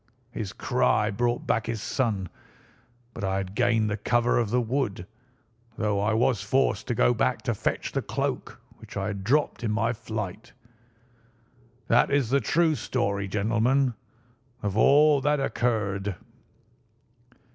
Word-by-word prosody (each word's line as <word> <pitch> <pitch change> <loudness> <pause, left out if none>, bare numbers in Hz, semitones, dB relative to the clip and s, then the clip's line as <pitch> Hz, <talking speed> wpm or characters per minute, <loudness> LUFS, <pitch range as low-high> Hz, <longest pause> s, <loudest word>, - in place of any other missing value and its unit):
His 105 -5 -5
cry 105 0 +1
brought 120 +3 -1
back 110 +1 0
his 115 -1 -2
son; 105 -5 -1 0.9
but - - -7
I 95 0 0
had 95 -1 -4
gained 115 -1 +2
the 105 0 -2
cover 120 +3 +2
of 115 -3 0
the 125 +3 +2
wood, 115 -6 -2 0.7
though 105 -2 0
I 105 +2 +1
was 115 -2 +2
forced 110 -2 0
to 120 - -1
go 120 - +4
back 125 +1 0
to 120 - 0
fetch 105 - -2
the - - -1
cloak - - -3 0.2
which - - -10
I 95 - -1
had 100 -1 -4
dropped 140 +3 +1
in 115 - 0
my 115 +2 +1
flight. 110 -3 -6 1.3
That 120 +1 +4
is 140 -4 +1
the 140 0 +3
true 165 -1 +2
story, 100 -8 -2
gentlemen, 115 +6 +1 0.7
of 100 -1 -2
all 145 +5 +5
that 150 +1 +1
occurred." 105 -7 -1
115 Hz, 145 wpm, -26 LUFS, 100-125 Hz, 1.3 s, all